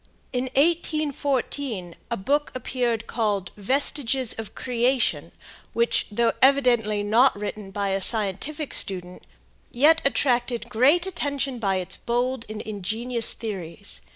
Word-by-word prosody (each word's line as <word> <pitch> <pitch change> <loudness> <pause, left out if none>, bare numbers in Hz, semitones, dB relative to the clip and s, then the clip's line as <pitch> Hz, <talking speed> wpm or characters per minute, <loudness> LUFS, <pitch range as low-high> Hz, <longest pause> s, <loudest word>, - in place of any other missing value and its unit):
In 250 0 0
1844 285 - 0 0.2
a 235 - -2
book 285 +10 0
appeared 240 -3 -1
called 205 -7 -1
"Vestiges 260 +2 +1
of 225 - -7
Creation," 250 +1 0 0.4
which, 235 0 +1
though 230 +2 +2
evidently 240 -6 +3
not 235 +6 +4
written 210 -1 -5
by 200 0 -2
a 195 0 0
scientific 225 - +1
student, 180 -2 -1 0.4
yet 305 +6 +4
attracted 245 -4 0
great 280 +10 +4
attention 280 -8 -2
by 195 -4 0
its 185 0 -1
bold 245 +1 -1
and 215 0 -6
ingenious 220 +4 -3
theories. 200 -4 -5
235 Hz, 120 wpm, -24 LUFS, 205-270 Hz, 0.4 s, not